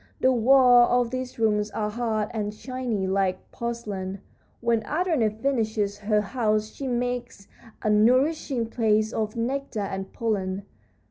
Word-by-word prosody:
The 260 - +4
walls 245 0 +6 0.2
of 230 - -9
these 255 0 -4
rooms 210 -2 +1
are 210 -1 -2
hard 220 -2 -1
and 210 -2 -2
shiny, 240 -3 -3
like 190 -1 -1
porcelain. 205 -5 -4 0.4
When 235 -1 +1
Andrena 305 - +1
finishes 220 -3 -1
her 210 0 +1
house 215 -1 0
she 275 - -6
makes 245 -4 -3 0.4
a 215 - +1
nourishing 255 +4 +2
paste 220 -1 +1
of 215 -1 -2
nectar 250 0 -2
and 195 -1 -4
pollen. 200 -4 -2
225 Hz, 135 wpm, -25 LUFS, 210-245 Hz, 0.4 s, walls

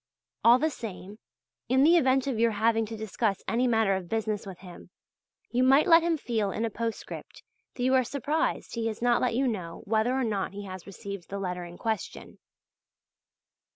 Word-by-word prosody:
All 235 +2 +7
the 310 +4 0
same, 210 -4 -8 0.5
in 260 +2 +4
the 330 +4 +6
event 265 -5 +3
of 260 -5 -2
your 230 0 +4
having 225 +1 +1
to 225 +1 -6
discuss 215 -1 -2
any 245 +2 +1
matter 225 -4 +3
of 185 -2 -5
business 215 -2 -2
with 190 -2 -8
him, 180 -1 -12 0.6
you 245 - +1
might 270 +3 +5
let 335 -2 +7
him 335 -1 +1
feel 225 -7 -1
in 220 +4 -2
a 225 - -3
postscript 230 +1 -6 0.3
that 245 - -3
you 260 +1 +3
are 260 -1 +5
surprised 285 +5 -2
he 230 -1 -1
has 220 -1 -4
not 240 0 +2
let 250 -2 +1
you 265 +2 +2
know 180 -8 -4
whether 220 +4 +1
or 265 - +1
not 205 -5 -2
he 205 +1 -6
has 185 -1 -9
received 200 -1 -8
the 200 - -4
letter 180 -2 -4
in 175 0 -11
question. 220 -5 -4
225 Hz, 195 wpm, -28 LUFS, 200-255 Hz, 0.6 s, All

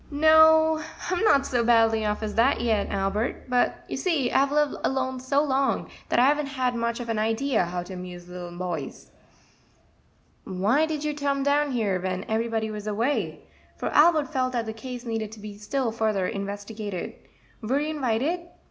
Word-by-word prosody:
"No, 315 +1 +5 0.3
I'm 360 +3 0
not 280 -11 +4
so 245 -4 0
badly 225 -1 +4
off 210 +1 -2
as 210 -1 -3
that 235 +5 +3
yet, 225 -3 0
Albert; 200 +7 -2
but 250 -1 0
you - - -4
see 315 -10 0
I've 275 +1 +3
lived 295 -1 +2
alone 260 -1 -1
so 275 +3 +1
long; 270 -1 0 0.2
that - - +1
I 245 - +6
haven't 275 -4 0
much 235 +1 -1
of 240 - -5
an 225 -2 -1
idea 225 0 +1
how 175 +1 -4
to 185 - -9
amuse 180 -1 -8
little 175 -1 -8
boys." 175 -6 -5 1.3
"Why 210 +12 +1
did 305 -2 -3
you 300 0 -1
tome 280 -1 -1
down 290 +1 +2
here 205 -6 0
when 185 0 -2
ev'rybody 220 0 -1
was 210 0 -6
away?" 230 +7 -1 0.4
for - - -2
Albert 310 -1 +4
felt 255 -1 0
that 235 -2 -1
the 220 - -5
case 245 +2 -8
needed 225 -2 -3
to 220 - -11
be 210 0 -8
still 245 +3 -1
further 215 -4 0
investigated; 205 -1 -5 0.5
"were 250 +5 0
you 300 +1 -2
inwited?" 275 +4 0
235 Hz, 175 wpm, -25 LUFS, 210-280 Hz, 1.3 s, I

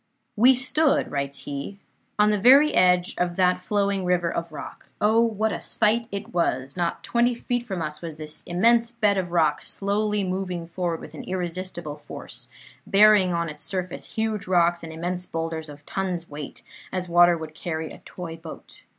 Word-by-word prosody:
"We 250 +5 +6
stood," 275 +4 +2
writes 140 -1 -3
he, 140 +7 -6 0.4
"on 210 0 +4
the 210 - +1
very 275 +8 +7
edge 180 -1 +3
of 175 -1 0
that 180 0 +3
flowing 200 0 0
river 180 -2 +1
of 170 0 -4
rock. - - -9
Oh, 220 +2 +4
what 220 -1 +1
a - - -4
sight 225 +2 +1
it 200 +3 -6
was! 135 -6 0
Not 175 -2 -2
twenty 240 +1 +2
feet 245 +1 -2
from 190 -8 -4
us 150 0 -5
was 165 -3 -6
this 155 0 -8
immense 230 +6 +3
bed 215 -4 +1
of 180 -2 -2
rock 155 -4 +2
slowly 210 +1 0
moving 185 -2 -3
forward 170 -1 -3
with 150 - -10
irresistible 175 -2 -5
force, - - -9 0.4
bearing 205 -2 +6
on 170 -1 -1
its 150 -2 -7
surface 185 -2 -4
huge 220 -3 -1
rocks 175 -1 +3
and 165 - -8
immense 175 +2 -4
boulders 165 -1 -4
of 145 0 -12
tons' 185 -3 -3
weight 145 -1 -8 0.3
as 185 -1 -2
water 175 0 +5
would 160 -1 -8
carry 160 -1 -4
a - - -10
toy 170 -3 -8
boat. 165 -1 -11
180 Hz, 175 wpm, -25 LUFS, 165-210 Hz, 0.4 s, very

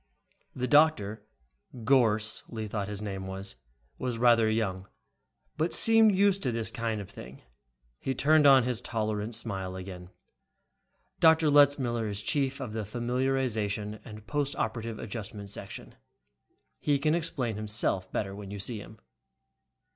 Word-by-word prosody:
The 125 0 -2
doctor, 115 -9 +3 0.6
Gorss, 110 -4 +2
Lee 110 -2 -5
thought 100 -1 -3
his 105 0 -4
name 95 -2 -5
was, 95 -3 -6 0.4
was 125 -2 -2
rather 115 -2 +4
young 95 -4 -1 0.7
but 160 +3 0
seemed 225 -2 +5
used 195 0 +3
to 125 - 0
this 115 -1 -1
kind 115 -2 -2
of 100 - -7
thing. 70 -9 -12 0.6
He 135 - -2
turned 150 +2 +5
on 135 -2 +7
his 125 -1 -2
tolerant 110 -1 -2
smile 95 -5 -4
again. 90 -1 -8 1.1
"Dr. 160 -1 +5
Letzmiller 135 -6 +4
is 100 0 -3
chief 140 0 0
of 125 -5 -5
the 110 - -2
Familiarization 120 -3 -1
and 105 -1 -11
Post 145 +1 -1
Operative 115 0 -3
Adjustment 105 -2 -7
Section. - - -8 0.9
He 145 -1 +2
can 150 +3 +1
explain 145 -9 -1
himself 105 -3 0
better 95 -2 -2
when 100 -1 -8
you 100 - -6
see 105 +3 -4
him." 110 +2 -12
115 Hz, 140 wpm, -29 LUFS, 105-135 Hz, 1.1 s, on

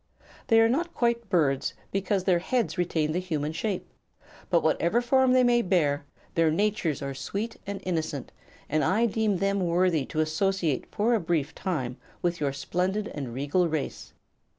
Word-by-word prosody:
They 225 -2 +5
are 225 - +6
not 335 +8 -1
quite 235 -2 0
birds, 150 -8 +1 0.2
because 195 0 0
their 185 -2 +3
heads 235 +6 0
retain 165 -4 0
the 175 - 0
human 155 -5 -2
shape; 190 +3 -3 0.6
but 170 -2 +3
whatever 170 +7 +2
form 260 +1 +3
they 255 0 +5
may 240 -1 +4
bear, 155 -8 +1 0.3
their 165 -1 +3
natures 170 -4 0
are 140 0 -3
sweet 205 - -4
and 200 -1 -4
innocent 160 -6 -3 0.4
and 155 +1 +1
I 220 +5 +3
deem 220 -3 +1
them 195 +2 +1
worthy 175 -4 +2
to 155 - -3
associate 160 -2 0
for 220 +3 +1
a 230 - +3
brief 160 -4 -1
time 130 -9 -3 0.3
with 175 -1 0
your 145 -2 0
splendid 185 +9 -1
and 135 -5 -5
regal 145 +8 +1
race. 155 -2 -4
180 Hz, 170 wpm, -27 LUFS, 155-210 Hz, 0.6 s, are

